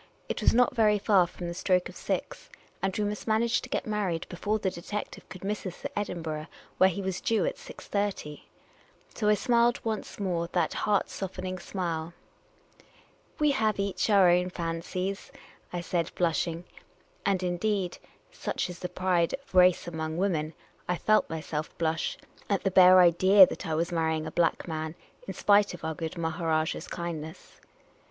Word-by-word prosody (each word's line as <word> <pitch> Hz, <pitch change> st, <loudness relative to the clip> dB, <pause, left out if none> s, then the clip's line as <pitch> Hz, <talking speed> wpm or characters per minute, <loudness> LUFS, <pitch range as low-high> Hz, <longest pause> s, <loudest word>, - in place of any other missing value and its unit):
It -, -, -3 dB
was -, -, +5 dB
not 250 Hz, +1 st, +3 dB
very 215 Hz, -3 st, +4 dB
far 195 Hz, -3 st, +4 dB
from 175 Hz, 0 st, -7 dB
the 170 Hz, -, -4 dB
stroke 180 Hz, 0 st, +1 dB
of -, -, -12 dB
six, -, -, -4 dB, 0.3 s
and 195 Hz, -1 st, -1 dB
we 210 Hz, -, +1 dB
must 210 Hz, +1 st, -4 dB
manage 230 Hz, +2 st, +2 dB
to -, -, -10 dB
get -, -, -2 dB
mar 210 Hz, -2 st, -1 dB
ried 165 Hz, -2 st, -2 dB
before 205 Hz, +4 st, -1 dB
the 195 Hz, -3 st, -1 dB
detective 205 Hz, +5 st, -6 dB
could 185 Hz, -, -10 dB
miss 210 Hz, +2 st, -2 dB
us 185 Hz, -3 st, -7 dB
at -, -, -3 dB
Ivdinburgh, 160 Hz, -6 st, -3 dB, 0.3 s
where 190 Hz, -, +7 dB
he 195 Hz, +2 st, -4 dB
was 190 Hz, -1 st, -3 dB
due 225 Hz, -, +1 dB
at -, -, -2 dB
6.30. 200 Hz, -, -4 dB, 0.7 s
So 210 Hz, -2 st, 0 dB
I 210 Hz, -, +5 dB
smiled 235 Hz, +2 st, +2 dB
once 220 Hz, -2 st, -4 dB
more 175 Hz, -4 st, -1 dB
that -, -, +1 dB
heart 205 Hz, -2 st, 0 dB
softening 185 Hz, -1 st, -5 dB
smile. 170 Hz, -3 st, -4 dB, 1.2 s
"We 300 Hz, -1 st, +3 dB
have 220 Hz, -6 st, +1 dB
each 200 Hz, 0 st, -1 dB
our 200 Hz, -3 st, +6 dB
own 180 Hz, +1 st, +2 dB
fancies," 180 Hz, +3 st, -4 dB, 0.4 s
I 175 Hz, -, -3 dB
said, 170 Hz, -1 st, -1 dB
blushing 170 Hz, 0 st, 0 dB, 0.3 s
— -, -, -35 dB
and, 190 Hz, -2 st, +1 dB
indeed 180 Hz, +1 st, -1 dB, 0.3 s
(such -, -, -3 dB
is 175 Hz, -, -10 dB
the 180 Hz, -, -4 dB
pride 180 Hz, -2 st, +1 dB
of 275 Hz, -6 st, -19 dB
race 180 Hz, -1 st, +5 dB
among 160 Hz, -1 st, -4 dB
women), 165 Hz, -5 st, -1 dB, 0.3 s
I 180 Hz, -, 0 dB
felt 215 Hz, +4 st, +2 dB
myself 155 Hz, -1 st, -4 dB
blush 160 Hz, -1 st, -1 dB, 0.3 s
at 200 Hz, -2 st, 0 dB
the 195 Hz, -, +1 dB
bare 185 Hz, 0 st, +8 dB
idea 185 Hz, +3 st, +7 dB
that -, -, -6 dB
I 160 Hz, -, -1 dB
was 170 Hz, +2 st, -1 dB
marrying 160 Hz, -2 st, 0 dB
a 155 Hz, -, -5 dB
black 170 Hz, 0 st, +1 dB
man, 160 Hz, 0 st, -4 dB, 0.3 s
in -, -, -5 dB
spite 205 Hz, -2 st, +3 dB
of 175 Hz, -, -9 dB
our 160 Hz, -, -1 dB
good 160 Hz, +2 st, -5 dB
Maharajah's 160 Hz, -1 st, -1 dB
kindness. 160 Hz, -3 st, -7 dB
180 Hz, 175 wpm, -28 LUFS, 170-205 Hz, 1.2 s, bare